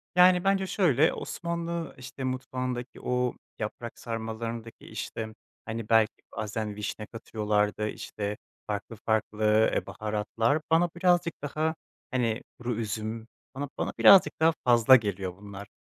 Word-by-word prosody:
Yani, 180 0 +6
bence 195 -1 +2
şöyle, 160 - +3
Osmanlı 170 -1 -4
işte 130 +1 -8
mutfağındaki 130 -1 -3
o 125 0 0 0.3
yaprak 115 +2 -5
sarmalarındaki 115 0 -5
işte, 110 -1 -5 0.3
hani, 110 -1 -5
belki 115 0 +5 0.2
bazen 110 -1 -3
vişne 105 +1 -4
katıyorlardı, 105 -1 -1
işte, 105 -1 -4 0.3
farklı 105 +2 -4
farklı 110 0 -1 0.3
e, - - 0
baharatlar, 110 +6 0
bana 170 +2 +4
birazcık 175 -1 +3
daha 155 +2 -1 0.4
hani 120 -2 0 0.2
kuru 120 -1 -2
üzüm, 110 +1 -3 0.3
bana 140 +1 -4
bana - - -2
birazcık 180 -6 +8
daha 160 +1 +5
fazla 120 +1 +7
geliyor 100 -6 -1
bunlar. 100 0 -9
115 Hz, 125 wpm, -28 LUFS, 110-145 Hz, 0.4 s, birazcık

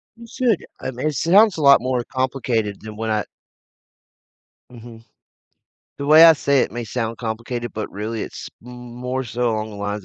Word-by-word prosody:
You 230 0 -13
should, 240 -5 0
I - - -4
mean, 130 +5 -3
it 155 - -1
sounds 195 +3 +4
a - - -3
lot 140 -3 +7
more 125 -1 -1
complicated 120 -6 -2
than 110 -1 -9
what 110 +1 -4
I 105 -2 0 1.5
Mhm, 115 -1 -13 1.0
the 140 - -4
way 155 +2 +8
I 165 - +9
say 140 -3 +1
it - - -1
may 120 0 -5
sound 115 0 -4
complicated, 120 +1 -5
but, 110 - -5
really, 110 +2 -5
it's - - -8 0.2
m 125 - -11
m - - -10 0.2
more 125 +1 -3
so 120 0 -1
along 110 0 -3
the 105 - -10
lines 105 -1 -4
120 Hz, 190 wpm, -21 LUFS, 110-140 Hz, 1.5 s, I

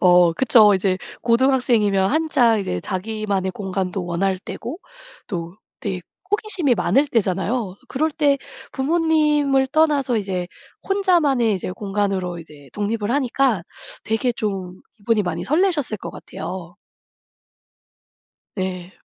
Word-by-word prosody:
어 180 -2 +6
그쵸. 215 -1 +5
이제 190 -1 +1 0.2
고등학생이면 235 -6 +3
한창 285 -7 +3
이제 90 - -3
자기만의 200 - -2
공간도 190 -1 -3
원할 185 +2 0
때고 245 - -7 0.5
또 170 -3 -5 0.2
되게 195 -4 -3 0.3
호기심이 390 - +1
많을 275 +5 +2
때잖아요. 200 -1 0
그럴 310 +4 0
때 290 -2 +2 0.3
부모님을 300 -2 +2
떠나서 285 -4 +2
이제 190 -4 -2 0.4
혼자만의 335 - +3
이제 185 - -4
공간으로 195 -3 -2
이제 150 -4 -13
독립을 210 +1 -2
하니까 260 -5 +1 0.4
되게 225 +3 0
좀 190 -5 -4 0.2
기분이 215 0 +1
많이 175 -2 -3
설레셨을 305 - +1
것 - - -7
같아요. 175 -2 -8 1.8
예. 185 -1 -4
215 Hz, 270 characters per minute, -21 LUFS, 185-275 Hz, 1.8 s, 어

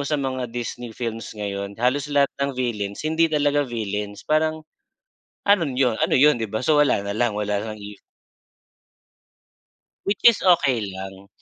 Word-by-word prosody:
sa 150 - +1
mga 130 -3 -3
Disney 120 0 -6
films 115 -2 -5
ngayon 100 -1 -4
halos 130 +5 0
lahat 140 -1 +2
ng 140 -2 -1
villains 105 -3 -3
hindi 160 +1 +2
talaga 145 -2 +1
villains 105 -3 -4
parang 155 0 0 0.8
ano 200 -4 +5
yun, 125 -3 +1
ano - - -2
yun 150 +2 +5
'di 115 -3 -4
ba? 110 - -1
So 150 +4 +2
wala 150 -8 +3
na 100 +1 -4
lang, 120 0 +1
wala 105 0 -2
ng 105 - -11
evil. 100 0 -10 2.1
Which 200 0 0
is 235 -3 +7
okey 140 - +3
lang. 95 +1 -9
120 Hz, 160 wpm, -23 LUFS, 105-145 Hz, 2.1 s, is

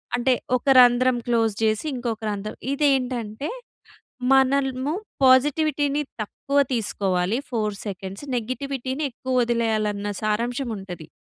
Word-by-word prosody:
అంటే 245 +2 +2 0.2
ఒక 255 - -1
రంధ్రం 245 0 +5
క్లోజ్ 225 -2 +2
చేసి 215 +4 +1
ఇంకొక 235 -3 -3
రంధ్రం. 205 +1 -5
ఇదేంటంటే 260 -4 0 0.8
మనల్‌ము 270 +1 +2 0.3
పాజిటివిటీ‌ని 290 +2 +3 0.2
తక్కువ 275 +6 -3 0.2
తీసుకోవాలి 195 -2 0
ఫోర్ 215 -4 -1
సెకండ్స్ 195 +4 -6
నెగెటివిటీ‌ని 260 +3 -3
ఎక్కువ 260 +2 -5
వదిలేయాలన్న 220 -3 0
సారాంశం 235 +5 -1
ఉంటది. 180 -5 -9
240 Hz, 100 wpm, -24 LUFS, 215-265 Hz, 0.8 s, రంధ్రం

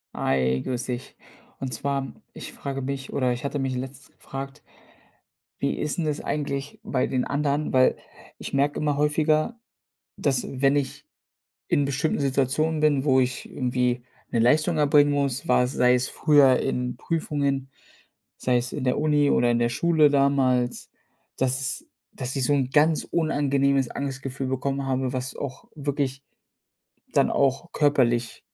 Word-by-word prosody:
Hi, 65 -1 +1
grüß 125 -1 -2
dich. 125 0 -5 0.4
Und 130 -3 -4
zwar, 140 +3 -2 0.2
ich - - -8
frage 135 -1 -5
mich 135 0 -4
oder 130 -2 +1
ich 120 - -7
hatte 140 +1 -2
mich 135 -2 -2
letztens 135 +2 -8
gefragt, 135 0 -7 1.0
wie - - 0
ist 150 +2 -2
'n 170 - 0
das 150 -1 -1
eigentlich 140 -1 -3
bei 130 -2 0
den 130 -2 0
anderen? 145 +1 -1
Weil 130 0 +4 0.4
ich - - -7
merke 140 +1 +1
immer 145 -2 0
häufiger, 155 +7 +1 0.6
dass, 135 -3 0 0.2
wenn 135 0 +4
ich 140 -2 -2 0.6
in 145 - +2
bestimmten 140 +3 -1
Situationen 140 +3 +1
bin, 145 -3 +2
wo 130 -3 +4
ich 125 -1 -2
irgendwie 125 -1 -1 0.3
'ne - - 0
Leistung 155 +8 +3
erbringen 145 0 +4
muss, 140 -3 -1
war 125 0 +4
es 125 - -3
sei 125 0 +4
es 125 +1 +1
früher 145 -4 +4
in 125 0 -2
Prüfungen, 140 -3 -1 0.7
sei 125 -1 +1
es 125 +1 -4
in - - -4
der 125 - +1
Uni 150 -1 +3
oder 120 - +3
in 120 - +2
der 120 0 +2
Schule 160 +3 +4
damals, 135 -3 +1 0.5
dass 130 +1 0
s 140 - -3 0.3
dass 130 0 -5
ich 135 - +1
so 145 - +3
'n 135 -2 0
ganz 155 +2 +3
unangenehmes 140 -4 +1
Angstgefühl 135 -1 -4
bekommen 135 +1 -2
habe, 130 -1 -1
was 130 +1 -4
auch 135 -2 -7
wirklich 140 -2 -2 0.9
dann - - +3
auch 140 +5 0
körperlich 120 -5 +1
135 Hz, 160 wpm, -25 LUFS, 130-145 Hz, 1.0 s, Weil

